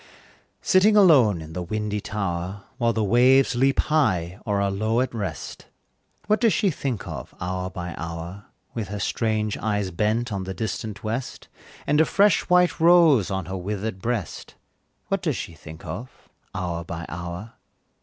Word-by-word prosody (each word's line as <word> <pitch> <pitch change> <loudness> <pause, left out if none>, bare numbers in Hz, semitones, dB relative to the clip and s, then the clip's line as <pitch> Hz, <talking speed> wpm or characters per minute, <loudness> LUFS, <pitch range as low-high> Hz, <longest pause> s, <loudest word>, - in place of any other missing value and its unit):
Sitting 210 +3 +5
alone 130 - +5
in 80 0 -10
the 90 - -3
windy 105 +3 -3
tower, 95 -1 -3 0.2
While 115 -1 +3
the 110 -1 0
waves 125 +6 +5
leap 135 +2 +2
high, 95 - +1
or 100 -1 +1
are 100 0 +1
low 110 +4 0
at 130 0 -1
rest, 105 -4 -5 0.6
What 215 +2 +2
does 230 -3 +4
she 195 - +2
think 130 -8 -3
of, - - -7
hour 90 +1 -3
by 90 -2 -6
hour, 85 +4 -6 0.3
With 110 -4 -3
her 105 +1 -5
strange 110 0 -1
eyes 105 -3 -1
bent 110 +6 0
on 95 -1 -2
the 95 0 -5
distant 110 0 -4
west, 115 +4 -4 0.4
And 150 +2 +3
a - - +5
fresh 200 +2 +3
white 180 -1 +4
rose 165 - +6
on 95 -3 -2
her 95 +2 -4
withered 100 +1 -4
breast, 115 -4 -4 0.5
What - - 0
does - - -1
she - - -6
think 80 0 -12
of, 125 +2 -6 0.5
hour 85 -2 -3
by 85 0 -6
hour? 85 +6 -6
105 Hz, 165 wpm, -24 LUFS, 95-125 Hz, 0.6 s, rose